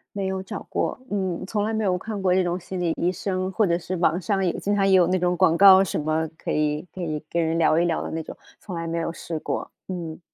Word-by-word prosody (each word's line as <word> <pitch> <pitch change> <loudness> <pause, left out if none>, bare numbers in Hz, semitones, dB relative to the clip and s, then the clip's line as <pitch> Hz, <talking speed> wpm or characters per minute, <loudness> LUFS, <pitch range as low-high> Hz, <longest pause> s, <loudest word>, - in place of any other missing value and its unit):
没 195 -1 -2
有 190 0 -2
找 195 +2 -7
过， - - -1
嗯， 190 -3 -2
从 205 +2 -1
来 220 +1 -1
没 220 - 0
有 185 -3 +1
看 215 +1 -5
过 185 -2 +2
这 185 0 +3
种 175 +1 -1
心 185 +1 -6
理 170 -2 +1
医 175 +1 +1
生， 185 0 -2
或 215 +2 +2
者 170 - +2
是 180 +1 -4
网 170 0 +2
上 195 +1 0
也 175 - +2
经 205 +1 0
常 195 -1 +2
也 190 - +4
有 180 -2 +6
那 185 +1 +1
种 180 0 +1
广 175 -3 +4
告 190 0 +8
什 190 - -2
么， 155 +1 0
可 - - -4
以 150 0 0
可 185 - -7
以 155 -3 -3
跟 170 -1 0
人 160 +1 0
聊 160 0 +4
一 175 - +2
聊 165 - 0
的 - - -5
那 160 - -3
种， - - -9 0.2
从 185 - -7
来 165 0 -4
没 165 +1 -2
有 165 0 -1
试 165 -1 -5
过， - - -4 0.2
嗯。 170 -4 -5
180 Hz, 300 characters per minute, -24 LUFS, 165-190 Hz, 0.2 s, 告